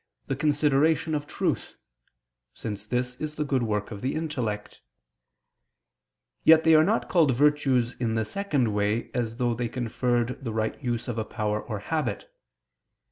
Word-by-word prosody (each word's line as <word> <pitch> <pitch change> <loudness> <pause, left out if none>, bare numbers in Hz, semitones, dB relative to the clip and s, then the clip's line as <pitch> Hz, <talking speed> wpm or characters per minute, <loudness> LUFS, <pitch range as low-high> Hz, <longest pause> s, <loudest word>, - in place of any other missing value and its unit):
the 135 - -2
consideration 150 +2 +2
of 145 -1 -2
truth - - -2 0.8
(since 105 -1 -5
this 125 +2 -1
is 155 0 -3
the 150 - -1
good 135 -3 +1
work 105 -2 -1
of 100 -2 -7
the 130 - -1
intellect): 125 -10 -3 1.6
yet 160 0 +7
they 160 - +5
are 155 0 +7
not 215 +7 +1
called 155 -8 +3
virtues 135 -3 +2
in 115 -2 0
the 110 -1 0
second 140 - 0
way, 105 +2 0
as 115 -2 -2
though 120 -2 +1
they 120 0 -2
conferred 120 +1 -1
the 115 -4 -3
right 110 +5 -2
use 120 -1 -2
of 120 -2 -2
a - - 0
power 105 -1 -2
or 110 - -5
habit. 145 +5 -3
125 Hz, 160 wpm, -26 LUFS, 110-150 Hz, 1.6 s, yet